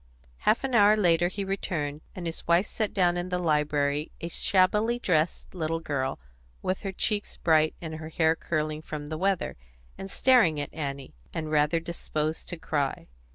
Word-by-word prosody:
Half 225 - +3
an 265 -1 -2
hour 210 -1 +6
later 175 -3 +4
he 200 +2 -4
returned, 155 -6 -3
and 180 - -6
his 165 -1 -5
wife 170 +3 +4
set 215 0 -2
down 175 -3 +2
in 175 +1 -3
the 180 - 0
library 150 -2 +1
a 170 - -4
shabbily 210 +7 +2
dressed 170 -7 0
little 165 -2 -1
girl, 140 -4 -2 0.5
with 185 +1 -1
her 195 - -4
cheeks 205 +2 -1
bright 155 -1 +3
and 160 -1 -5
her 160 0 -7
hair 160 0 +2
curling 155 -1 -2
from 150 -2 -6
the 155 - -3
weather, 195 -1 0 0.4
and 195 - -6
staring 210 - +4
at 145 - -5
Annie, 140 -3 -5 0.2
and 155 -1 -3
rather 150 +2 +3
disposed 160 -2 -3
to 175 - -5
cry. 145 - -2
165 Hz, 175 wpm, -27 LUFS, 155-185 Hz, 0.5 s, hour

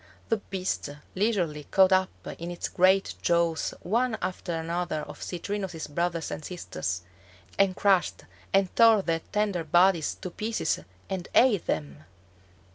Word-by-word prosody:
The 225 - +3
beast 190 -6 -3 0.2
leisurely 180 -8 0
caught 190 -1 +4
up 185 0 +4 0.3
in 170 +1 -5
its 175 - -4
great 190 +2 +3
jaws 170 -1 +1
one 230 +4 +1
after 180 -1 -4
another 165 0 -2
of - - -10
Citrinus's 185 -2 -4
brothers 170 +2 -2
and - - -5
sisters, 90 - -4 0.6
and 195 -2 +4
crushed 195 -2 +2 0.3
and 195 -1 +2
tore 225 -3 +6
their 165 -2 0
tender 205 -5 0
bodies 175 +1 +3
to 185 - -5
pieces 215 -4 -1 0.3
and 190 -2 -4
ate 230 -8 +4
them! 75 -1 -3
180 Hz, 135 wpm, -27 LUFS, 165-195 Hz, 0.6 s, tore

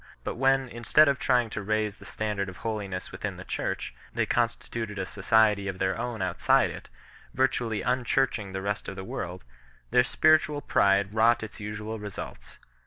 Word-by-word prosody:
But - - -3
when, 135 +1 +2
instead 120 +6 +4
of 140 -1 +2
trying 125 -3 +2
to 105 - -3
raise 105 0 -1
the - - -14
standard 105 -2 -2
of 90 - -10
holiness 100 -4 -3
within - - -5
the - - -8
Church, - - -3 0.2
they - - 0
constituted 115 -2 -1
a 95 - -2
society 105 0 +3
of 95 -1 -3
their 95 0 0
own 115 -3 -3
outside 90 -2 +3
it, - - -10 0.5
virtually 120 -4 +1
unchurching 125 -4 0
the 95 0 -4
rest 100 0 -2
of - - -5
the 95 - -6
world, 90 -1 -5 0.5
their 125 +1 +5
spiritual 150 +3 +3
pride 100 -3 +2
wrought 115 +1 +4
its 110 - -8
usual 110 +1 -5
results. 105 -2 -8
110 Hz, 175 wpm, -27 LUFS, 100-120 Hz, 0.5 s, their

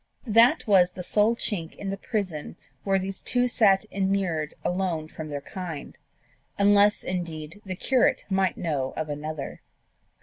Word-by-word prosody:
That 235 +7 +5
was 185 -5 +4
the 180 - -6
sole 210 +5 +2
chink 170 -8 -3
in 195 -1 -5
the - - -2
prison 190 -9 -4 0.3
where 195 -1 +2
these 190 +1 -4
two 250 0 +2
sat 205 -4 +3
immured 190 -6 -1
alone 175 -4 -1
from 155 -1 -8
their 145 -1 -4
kind 165 -2 -7 0.6
unless, 205 +1 +4
indeed, 170 0 -5
the 185 - -3
curate 255 +6 +2
might 190 -2 +1
know 140 -6 -2
of 155 -1 -3
another. 150 0 -5
190 Hz, 145 wpm, -26 LUFS, 160-205 Hz, 0.6 s, That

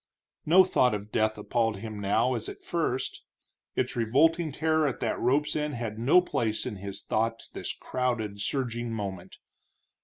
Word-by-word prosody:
No 180 +4 +8
thought 125 -10 +3
of 105 +1 -7
death 110 0 +1
appalled 115 0 0
him 110 0 -6
now 100 +6 +2
as 115 -3 -3
at - - -10
first; 160 -7 -2 0.5
its - - -1
revolting 155 +8 +3
terror 155 +1 +2
at 135 - -3
that - - -1
rope's 140 +5 +1
end 150 -2 -1
had 115 -2 -4
no 140 +10 +5
place 115 -11 -1
in 115 -5 -4
his 100 0 -7
thought 115 +1 -1
this - - -3
crowded, 115 -5 -2
surging 120 0 -2
moment. 100 -5 -5
120 Hz, 160 wpm, -28 LUFS, 110-145 Hz, 0.5 s, No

